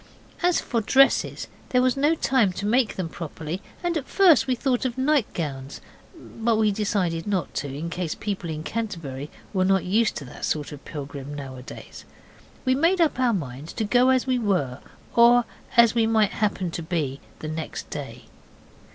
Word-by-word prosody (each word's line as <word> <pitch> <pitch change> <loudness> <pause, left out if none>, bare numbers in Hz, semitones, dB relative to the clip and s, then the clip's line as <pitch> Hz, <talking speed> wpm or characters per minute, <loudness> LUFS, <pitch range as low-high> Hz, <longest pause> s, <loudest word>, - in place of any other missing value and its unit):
As 355 -1 +3
for 230 -3 -1
dresses, 270 +5 +3 0.2
there 250 - +3
was 255 -1 +3
no 295 +4 +3
time 255 - +2
to 190 +3 -4
make 235 +1 +2
them 185 -3 -2
properly, 160 +2 -6 0.2
and 345 -1 0
at 285 -4 -2
first 340 - +5
we 255 - +2
thought 250 0 0
of 255 -1 -2
nightgowns; 170 - -1 0.4
but 230 -8 -2
we 215 -1 +3
decided 195 -5 -1
not 190 -6 -1
to, 145 - -3
in 150 +5 -5
case 175 -2 -3
people 195 -5 -4
in 155 -1 -4
Canterbury 160 -10 -4 0.2
were 185 -2 +2
not 190 0 +3
used 215 +5 +2
to 140 - -6
that 125 - -11
sort 150 -2 -2
of 145 -1 -10
pilgrim 145 -1 -7
nowadays. 130 -3 -9 0.6
We 255 - +4
made 335 +7 +3
up 320 -6 +2
our 250 -2 +3
minds 145 - -4
to - - -2
go 245 +4 +4
as 260 -1 +3
we 255 -1 +1
were 180 - 0 0.4
or 235 0 +6 0.3
as 235 -2 +7
we 230 -1 +2
might 220 -2 +3
happen 195 -4 -1
to 170 - -4
be 155 -5 -2 0.2
next 155 +1 -5
day. - - -6
205 Hz, 175 wpm, -25 LUFS, 155-250 Hz, 0.6 s, as